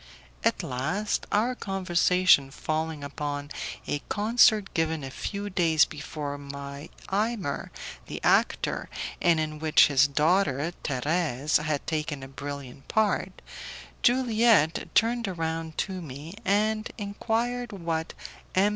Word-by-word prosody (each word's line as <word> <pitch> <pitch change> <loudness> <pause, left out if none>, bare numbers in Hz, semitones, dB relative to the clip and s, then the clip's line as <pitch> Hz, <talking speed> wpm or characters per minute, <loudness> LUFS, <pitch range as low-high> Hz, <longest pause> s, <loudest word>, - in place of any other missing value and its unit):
At - - +1
last, 155 +12 -2
our 225 +5 +2
conversation 185 - +3
falling 155 +1 -3
upon 145 0 -4 0.3
a 145 - -1
concert 215 -1 +4
given 160 -2 0
a 135 - -6
few 200 +8 -4
days 165 -5 +3
before 145 -1 -5
by 140 +1 -8 0.2
Imer, 210 -7 -1 0.4
the - - -5
actor, - - +2 0.3
and 170 -2 +4
in 155 -1 -3
which 155 -1 +5
his 140 0 +5
daughter, 155 +1 +2
Thérèse, 150 +1 +1
had 150 -2 -1
taken 155 -3 -2
a - - -7
brilliant 140 -1 -8
part, 205 -3 0 0.6
Juliette 230 - +3
turned 230 0 +3
round 160 -1 -3
to 190 -2 -2
me 150 +2 -8
and 215 +2 +1
inquired 235 +4 -2
what 165 -4 -3 0.4
M. 195 +2 +4
160 Hz, 120 wpm, -27 LUFS, 145-205 Hz, 0.6 s, which